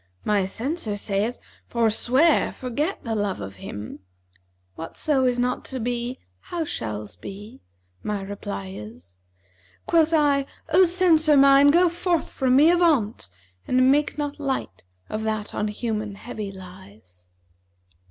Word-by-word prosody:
My 205 -2 +2
censor 225 - -3
saith, 205 +4 -1 0.3
'Forswear, 240 +7 +2
forget, 285 +9 -3
the 230 - -3
love 205 -3 -1
of 95 0 -8
him,' 105 +3 -8 0.4
* 90 0 -43
'Whatso 260 - -1
is 250 -1 +2
not 250 +1 -1
to 260 - -5
be, 240 +1 -3 0.2
how 335 - -4
shall's 105 - -5
be?' 200 - -10 0.4
My 210 -2 -3
reply 100 - -6
is. 90 -3 -11 0.7
Quoth 325 -1 +3
I, 285 -3 +3 0.2
'O 370 +3 +6
Censor 330 -4 +4
mine, 275 +1 +7
go 350 +4 +5
forth 345 0 -1
from 260 -2 +1
me, 305 +5 +7
avaunt! 295 - +2 0.2
* 90 0 -36
And 255 +1 +4
make 295 +2 +1
not 290 -1 -3
light 265 - -3 0.2
of 215 - -4
that 215 -1 -3
on 210 - -1
humans 210 -1 -3
heavy 215 -3 -6
lies.' 110 - -14
230 Hz, 140 wpm, -24 LUFS, 190-285 Hz, 0.7 s, mine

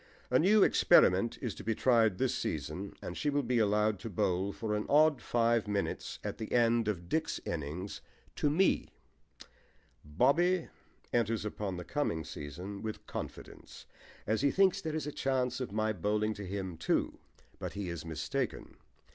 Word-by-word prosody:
A 125 - +5
new 200 +4 +5
experiment 95 +6 +4
is 120 -5 -2
to - - -10
be 115 0 0
tried 115 -6 +3
this 130 -1 +1
season, 80 +6 -4
and - - -5
she 150 - -1
will 145 0 +1
be 120 0 +1
allowed 105 -1 +2
to 115 - -6
bowl 95 0 0
for 110 0 -3
an 105 0 -2
odd 150 0 +5
five 115 -2 +1
minutes 100 -1 -2
at - - -5
the 110 - -5
end 115 -2 +3
of 90 -5 -2
Dick's 160 - -1
innings 85 +5 -4 0.4
to 145 - +2
me. 180 +6 +2 1.1
BOBBY 165 - +2 0.4
enters 115 -2 +1
upon 100 -3 -3
the 90 - -6
coming 85 - -1
season 85 +7 -7
with 110 -1 -6
confidence, - - -8 0.4
as 110 +1 0
he 140 - +4
thinks 195 +4 +3
there 155 -3 -3
is 155 -3 -2
a 150 - -3
chance 130 -2 -1
of 130 -6 -4
my 110 +1 0
bowling 105 +3 0
to 100 -2 -7
him 95 -3 -4
too; - - 0 0.4
but - - -5
he 100 -2 -4
is 85 -3 -5
mistaken. 80 -1 -4
110 Hz, 170 wpm, -32 LUFS, 95-130 Hz, 1.1 s, A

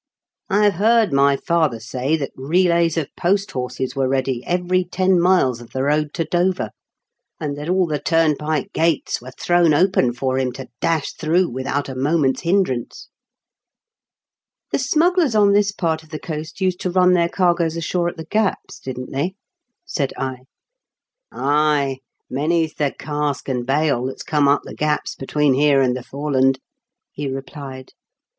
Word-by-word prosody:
I 205 +2 +3
have 205 -1 +4
heard 215 -1 +3
my 140 0 +4
father 160 -9 0
say 130 +6 -1
that 140 -3 -4
relays 170 +3 +2
of 155 -4 0
post 195 +3 0
horses 125 +1 -4
were 135 -1 +1
ready 130 -2 -1
every 180 +1 +1
ten 185 +1 +1
miles 170 -10 +3
of 120 - -14
the 130 - -1
road 150 +1 +1
to 165 - -1
Dover, 180 +3 0 0.7
and 150 -3 -3
that 150 +3 -6
all 185 0 +3
the 150 -3 -2
turnpike 155 -1 0
gates 165 -6 0
were 125 - -9
thrown 170 +3 +2
open 180 -7 +3
for 130 +2 -1
him 130 -2 -1
to 130 -1 -9
dash 160 -3 0
through 170 +3 +1
without 130 +3 -2
a 135 - -5
moment's 135 +1 +1
hindrance." 170 -9 -1 0.8
" 460 -1 -63
The - - +1
smugglers 315 0 +2
on 205 -1 +5
this 205 0 +3
part 165 -5 -1
of 160 - -20
the 155 - -5
coast 155 +4 -7
used 185 -1 +1
to 185 - -2
run 180 0 +4
their 170 -1 +2
cargoes 170 -3 +1
ashore 170 +1 -1
at - - -10
the 160 - -7
gaps, 210 +3 -1
didn't 125 -1 -7
they? 165 +8 -2 0.3
" 245 +8 -58
said 140 -4 0
I. 130 -1 -4 0.9
Ay, 145 -1 +1 0.3
many's 160 +4 0
the 145 -2 0
cask 145 -2 -3
and 125 -2 -2
bale 140 -3 +1
that's 130 - -5
<jome 150 -2 +2
up 140 +1 +3
the - - -9
gaps 150 0 -1
between 145 +1 +1
here 140 +1 +4
and 125 -2 +2
the 130 - -4
Fore 145 +4 -5
land," 135 0 +3 0.6
he 145 0 -4
replied. 135 -1 -7
150 Hz, 170 wpm, -20 LUFS, 135-175 Hz, 0.9 s, on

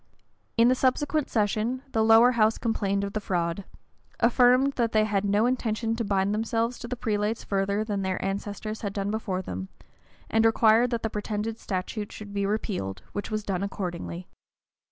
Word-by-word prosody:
In 230 +1 +6
the 255 - +5
subsequent 280 +3 +1
session, 220 +4 0
the 220 - +2
lower 225 +2 +7
house 220 -2 +3
complained 200 -4 0
of 200 0 -4
the 215 - -1
fraud; 175 0 -2 0.5
affirmed, 250 +3 +4
that 235 -3 0
they 215 0 +4
had 205 -2 0
no 205 +2 +2
intention 225 -2 0
to 230 - -2
bind 200 -1 +1
themselves 230 +2 -1
to 240 - -7
the 250 - -3
prelates 215 -1 -1
further 200 +1 0
than 205 -2 -2
their 190 -1 -1
ancestors 205 +2 -4
had 200 -2 -3
done 200 0 -2
before 195 -4 -2
them; 95 - -6 0.6
and 225 0 +2
required 225 +1 +5
that 235 -2 -2
the 225 - -1
pretended 215 +2 -3
statute 205 +2 -4
should 205 -1 -9
be 200 -1 0
repealed, 190 - -3
which 205 - -4
was 215 -1 -2
done 195 -3 -2
accordingly. 180 -3 -4
215 Hz, 175 wpm, -27 LUFS, 200-230 Hz, 0.6 s, lower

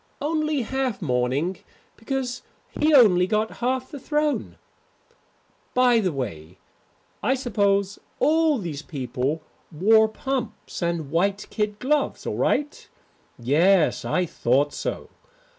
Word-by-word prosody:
Only 305 -2 0
half 260 -1 -2
mourning 135 +4 -1 0.4
because 250 +1 -3 0.3
he 305 +1 +1
only 200 -10 +6
got 215 +2 -1
half 255 +1 -1
the 285 - -7
throne. 300 +2 -1 1.2
By 250 -2 +5
the 190 -5 0
way, 90 - -6 0.6
I 265 - +2
suppose 200 -5 0 0.2
all 315 -1 +3
these 165 -9 -5
people 140 +1 -3 0.3
wore 220 +7 +4
pumps 240 -1 -5
and 170 -4 -2
white 195 +5 0
kid 210 -1 -2
gloves 285 +5 0
all - - -2
right? 295 0 -1 0.5
Yes, 160 +8 +3
I 180 - 0
thought 140 -1 +1
so. - - -4
210 Hz, 115 wpm, -24 LUFS, 160-260 Hz, 1.2 s, only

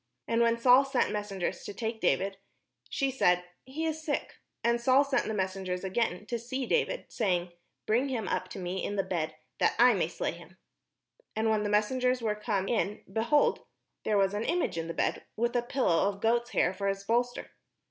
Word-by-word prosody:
And 230 0 +2
when 235 0 +3
Saul 250 +3 +6
sent 270 -2 0
mes 210 0 -3
sengers 190 -3 -3
to 205 - -7
take 225 +1 -3
David, 195 0 +1 0.5
she 275 -1 0
said, 180 -8 +3 0.2
"He 295 +5 -4
is 315 0 -2
sick." 295 -2 -3 0.3
And 235 0 +2
Saul 260 +3 +5
sent 275 -2 0
the 220 - -2
messengers 185 -1 -2
again 190 0 -1
to 235 +1 -3
see 255 +3 -3
David, 485 - 0
saying, 180 -5 0 0.2
" - - -52
Bring 245 +6 +2
him 230 -7 -2
up 185 - -1
to 185 - -9
me 185 +1 -3
in 205 - -2
the 195 - +1
bed, 165 -5 -2 0.2
that - - +3
I - - +7
may - - +1
slay - - -2
him." - - -13 0.8
And 220 0 +1
when 215 -1 +2
the 210 - -1
messengers 250 +5 +2
were 220 -3 0
come 210 -2 -2
in, 210 -2 -1
behold, 235 +7 +3 0.4
there 210 - +1
was 195 0 +3
an 205 +2 -1
image 345 - 0
in 165 0 -3
the 165 - -5
bed, - - 0
with 235 +2 0
a 245 - +3
pillow 235 -7 +2
of 200 -1 -6
goats' 235 +3 +1
hair 185 - +2
for 200 +1 -3
his 195 0 -1
bolster. 245 +3 -1
220 Hz, 210 wpm, -30 LUFS, 195-245 Hz, 0.8 s, I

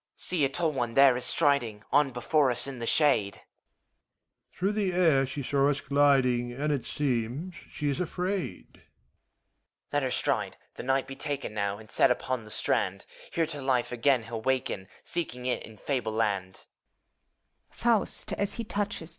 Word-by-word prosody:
HOMUNCULUS. - - -8
See! 175 -5 +1
a - - 0
tall 165 +3 0
one 120 -5 -2
there 135 -2 +7
is 125 - -2
striding 120 -9 +2
On 145 -1 +4
before 130 +3 +2
us, 125 0 -1
in 135 -3 -7
the 115 - -3
shade. 115 -11 +3 1.2
MEPHISTOPHELES. - - -26
Through 195 +3 +1
the 200 -4 0
air 160 -7 +3
she 135 +2 -5
saw 140 +2 +2
us 145 - 0
gliding. 135 -4 +2
And 145 +4 -1
it 130 -4 -3
seems 135 +6 -2 0.2
she 150 - -4
is 140 +2 -1
afraid. 180 - -3
HOMUNCULUS. - - -35
Let 145 - +2
her 130 - 0
stride! - - +1 0.2
The - - -7
knight 135 +1 +1
be 135 0 -8
taken 140 -4 -4
Now, 100 -1 -1
and 110 0 -14
set - - +4
upon 125 -3 -1
the - - -12
strand: - - 0 0.3
Here 165 - +1
to 150 -2 -5
life 130 -2 0
again 125 0 +2
he'll 115 0 -6
waken, 130 -6 -1 0.2
Seeking 125 -8 -4
it 125 - 0
in 110 -1 -12
fable 120 -3 -2
land. 100 -4 -2
135 Hz, 165 wpm, -28 LUFS, 120-145 Hz, 1.2 s, there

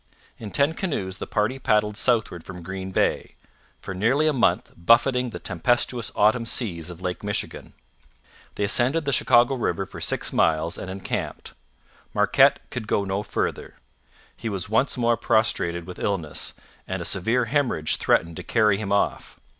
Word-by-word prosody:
In 110 - -7
ten 140 +8 +2
canoes 100 - -3
the - - -5
party 110 +5 -1
paddled 105 -3 +1
southward 110 -8 0
from 90 -2 -10
Green 95 +1 -6
Bay, 95 - -1 0.4
for 95 - -7
nearly 120 +11 +1
a 155 - +3
month 130 - +1
buffeting 125 +7 +3
the - - -7
tempestuous 120 +5 -1
autumn 115 +3 +2
seas 90 -10 -1
of 85 0 -10
Lake 90 +1 -4
Michigan. 100 0 -4 0.8
They - - -2
ascended 125 +9 +3
the 140 - 0
Chicago 120 +1 +4
river 125 - -1
for - - -11
six - - 0
miles 80 0 +1
and 95 - -6
encamped. 95 +1 -5 0.6
Marquette - - +4
could 110 - -5
go 100 - +1
no 95 +1 -2
farther; - - -3 0.6
he 115 - -5
was 95 -4 -2
once 130 +5 +2
more 120 -1 +2
prostrated 85 -7 +1
with 90 0 -9
illness, 90 -7 -1 0.3
and 95 0 -3
a 85 - -5
severe 115 +6 +2
hemorrhage 125 - +1
threatened 85 -1 +1
to - - -6
carry 105 -4 +2
him 100 -2 -4
off. 100 - -1
105 Hz, 160 wpm, -24 LUFS, 95-120 Hz, 0.8 s, Chicago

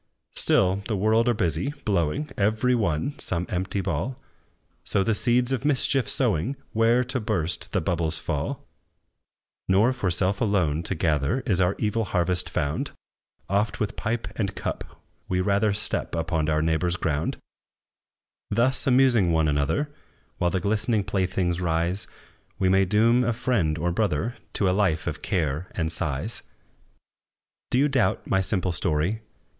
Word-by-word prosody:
Still 95 0 +2
the 110 - -1
world 110 +4 +3
are 120 - +2
busy, 110 - -1
blowing, 100 - 0
Every 110 +5 +2
one, 105 - -1
some 90 0 -1
empty 95 +2 -2
ball; 95 - -3 0.6
So 95 - 0
the 115 - +1
seeds 120 +3 +1
of 130 -1 -1
mischief 135 -3 +2
sowing, 120 - +1 0.2
Where, 115 +3 +3
to 125 +1 -1
burst, 90 -8 -1
the - - 0
bubbles 85 -2 0
fall. - - -3 1.0
Nor 105 +7 +4
for 110 -7 -1
self 90 +3 +1
alone 90 -9 +1
to 95 - -1
gather, 80 - 0
Is 100 -7 0
our 90 +2 +2
evil 110 +1 0
harvest 90 -1 0
found; 70 +2 -2 0.6
Oft, 100 +3 0
with 105 -1 -2
pipe 115 +1 -2
and 100 -4 -2
cup, - - -3 0.5
we 90 - +1
rather 100 +3 +2
Step 100 -3 -2
upon 80 -1 -1
our 75 0 +1
neighbor's 80 +2 +1
ground. 80 -4 -1 1.1
Thus, 120 +7 +2
amusing 125 -8 +4
one 80 -1 +2
another, 75 - 0 0.5
While 90 - +2
the 95 - -1
glistening 105 +2 0
playthings 95 -2 -1
rise, 85 +3 -1 0.5
We 95 - +2
may 95 +1 +4
doom 115 +5 +3
a 120 0 +1
friend 105 -10 0
or 85 +2 0
brother 105 +3 -1 0.2
To 100 - +1
a - - +3
life 95 -5 +1
of - - -4
care 80 -2 -1
and 80 -2 -1
sighs. 80 - -2 1.3
Do - - +1
you 140 +3 +4
doubt 135 -4 +1
my 95 - +1
simple 95 -1 +1
story? 85 +5 0
95 Hz, 150 wpm, -25 LUFS, 85-115 Hz, 1.3 s, Nor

